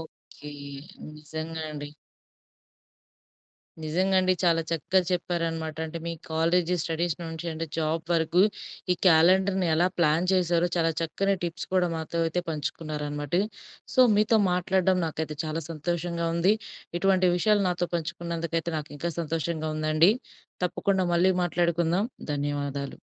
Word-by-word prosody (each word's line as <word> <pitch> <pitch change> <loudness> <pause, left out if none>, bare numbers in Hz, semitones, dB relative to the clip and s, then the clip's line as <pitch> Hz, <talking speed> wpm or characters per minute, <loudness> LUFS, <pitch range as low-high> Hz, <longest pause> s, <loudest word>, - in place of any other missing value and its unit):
Okay. 155 -2 -12 0.7
నిజంగా 160 +2 -6
అండి. 145 -1 -6 1.9
నిజంగా 185 +5 +1
అండి. 185 0 +3
చాలా 165 -1 +3
చక్కగా 170 +3 +2
చెప్పారనమాట. 165 -3 -1
అంటే 165 +1 -6
మీ 170 - -2 0.2
కాలేజీ 170 +2 +2
స్టడీస్ 165 0 -1
నుంచి 165 +1 -6
అంటే 165 +1 -4
జాబ్ 160 +1 0
వరకు, 165 +2 +3 0.5
ఈ - - +2
క్యాలెండర్‌ని 185 +3 +5
ఎలా 175 +3 +3
ప్లాన్ 165 +1 +3
చేశారో 175 -1 +2
చాలా 165 -1 +3
చక్కని 195 +4 0
టిప్స్ 165 -1 -4
కూడా 180 -1 +3
మాతో 160 +1 -4
అయితే 175 +2 -1
పంచుకున్నారనమాట. 150 -1 -4 0.6
సో, - - +5 0.2
మీతో 215 +1 +4
మాట్లాడడం 185 +1 +2
నాకైతే 155 -1 -4
చాలా 155 +1 -3
సంతోషంగా 170 +1 -2
ఉంది. 185 +5 +4 0.4
ఇటువంటి 190 0 +3
విషయాలు 205 +3 +3
నాతో 175 0 -1
పంచుకున్నందుకైతే 170 0 -3
నాకింకా 150 +3 -5
సంతోషంగా 160 0 -2
ఉందండి. 155 +4 +4 0.5
తప్పకుండా 190 +1 +1
మళ్ళీ 185 +2 +4
మాట్లాడుకుందాం, 170 +3 +1 0.3
ధన్యవాదాలు. 140 -1 -3
165 Hz, 120 wpm, -27 LUFS, 160-180 Hz, 1.9 s, క్యాలెండర్‌ని